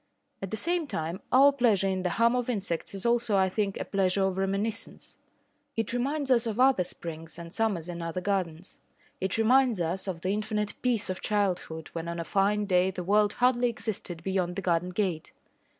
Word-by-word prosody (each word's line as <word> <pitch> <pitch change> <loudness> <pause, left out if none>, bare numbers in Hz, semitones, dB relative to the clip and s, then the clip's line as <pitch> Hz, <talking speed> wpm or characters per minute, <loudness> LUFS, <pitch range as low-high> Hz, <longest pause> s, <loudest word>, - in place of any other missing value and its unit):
At 195 - -4
the 220 - -2
same 340 +6 +1
time, 165 - -4
our 275 +2 +7
pleasure 230 -8 +2
in 190 -1 -1
the 180 - 0
hum 235 +2 +4
of 250 0 -1
insects 195 -5 -2
is 195 - -3
also, 235 -3 +2
I 190 -1 +3
think, 200 0 -2
a - - -3
pleasure 195 0 +1
of 190 0 -1
reminiscence. 200 +3 -2 0.6
It 225 0 -1
reminds 275 +3 -1
us 235 -2 +3
of 225 +1 -3
other 260 -7 +5
springs 165 -2 -6
and 170 -1 -9
summers 200 -7 0
in 175 -1 -6
other 165 +2 -3
gardens. 185 -3 -3 0.4
It 190 +2 -1
reminds 245 -1 +4
us 175 +4 -1
of 175 -3 -4
the 185 - -1
infinite 210 0 -2
peace 235 -6 0
of 185 - -6
childhood 180 -6 -1
when 165 0 -4
on 170 0 -4
a - - -2
fine 205 +4 +1
day 185 -1 +3
the 185 -1 -5
world 205 +2 +3
hardly 245 0 +2
existed 200 -7 -4
beyond 185 -2 -1
the 195 - -4
garden 175 0 +1
gate. 180 -4 -2
195 Hz, 200 wpm, -28 LUFS, 180-225 Hz, 0.6 s, our